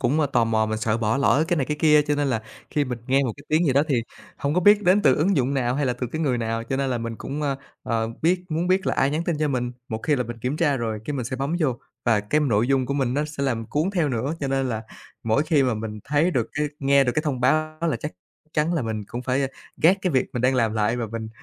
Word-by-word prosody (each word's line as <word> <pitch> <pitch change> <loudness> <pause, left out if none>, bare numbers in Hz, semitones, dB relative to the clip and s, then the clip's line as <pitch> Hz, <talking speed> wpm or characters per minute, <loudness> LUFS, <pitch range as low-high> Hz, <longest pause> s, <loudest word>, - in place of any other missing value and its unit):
cũng, 145 +6 +2
ơ, 145 - +3
tò 120 -4 +2
mò 110 -1 +1
mình 110 0 -2
sợ 110 0 0
bỏ 110 +2 +1
lỡ 140 +2 +3
cái 175 - +2
này 135 - 0
cái 150 - -2
kia, 150 -1 +6
cho 145 0 0
nên 145 -1 0
là 115 -4 -1 0.3
khi 150 -2 +1
mình 125 -2 -4
nghe 135 +2 +3
một 125 - -1
cái - - -14
tiếng 160 +2 +2
gì 135 - +3
đó, 140 - +4
thì 135 - +2 0.4
hông 140 +2 -1
có 180 - +3
biết 205 +3 +6
đến 200 +2 +4
từ 130 - +5
ứng 180 +5 +2
dụng 135 +1 +1
nào 125 -2 0
hay 145 0 0
là 125 - +1
từ 125 0 -4
cái 155 +7 -4
người 130 -6 +1
nào, 115 0 -2
cho 135 +3 -2
nên 135 -1 0
là 120 - 0
mình 115 -1 -4
cũng, 145 +3 -5
ơ, 140 -2 0 0.3
ờ, 115 -1 -1
biết 180 +2 +2
muốn 165 +3 -1
biết 190 +1 +2
là - - +1
ai 135 - +2
nhắn 160 +3 -1
tin 165 -4 -1
cho 155 -1 +1
mình. 125 -2 -1 0.2
Một 110 - -3
khi 150 -3 +2
là 125 - 0
mình 120 0 -7
kiểm 125 +6 -2
tra 150 -5 +2
rồi, 110 -3 -2
cái 145 - -3
mình 130 -4 -2
sẽ 130 - -4
bấm 140 +6 -1
vô 130 -6 +1 0.3
và 115 -3 +3
cái 110 +9 0
nội 115 -5 +2
dung 135 -2 +2
của 140 - -2
mình 130 -3 0
nó 145 +2 +1
sẽ 150 -2 -5
làm 115 -5 -1
cuốn 155 +6 0
theo 170 -7 +1
nữa. 130 +5 -1
Cho 140 - -1
nên 135 -1 0
là 110 -2 -3 0.4
mỗi 115 +6 +2
khi 155 -3 +2
mà 125 -3 +1
mình 110 0 -5
thấy 150 +5 +2
được 120 -8 0
cái 150 0 -1
nghe 140 0 +4
được 125 - +1
cái 155 - +1
thông 135 -5 -2
báo 155 +4 +1
là 170 -2 0
chắc 150 - -5 0.4
chắn 155 +3 +1
là 160 - 0
mình 110 -2 -3
cũng 120 +1 -6
phải, 130 +2 0
ơ, - - +1 0.3
gác 175 +5 +5
cái 185 - +1
việc 130 -5 +2
mình 120 - -2
đang 130 +1 +3
làm 115 -3 +2
lại 110 +2 +1
và 120 -2 -2
mình 110 0 -5
135 Hz, 310 wpm, -24 LUFS, 120-150 Hz, 0.4 s, kia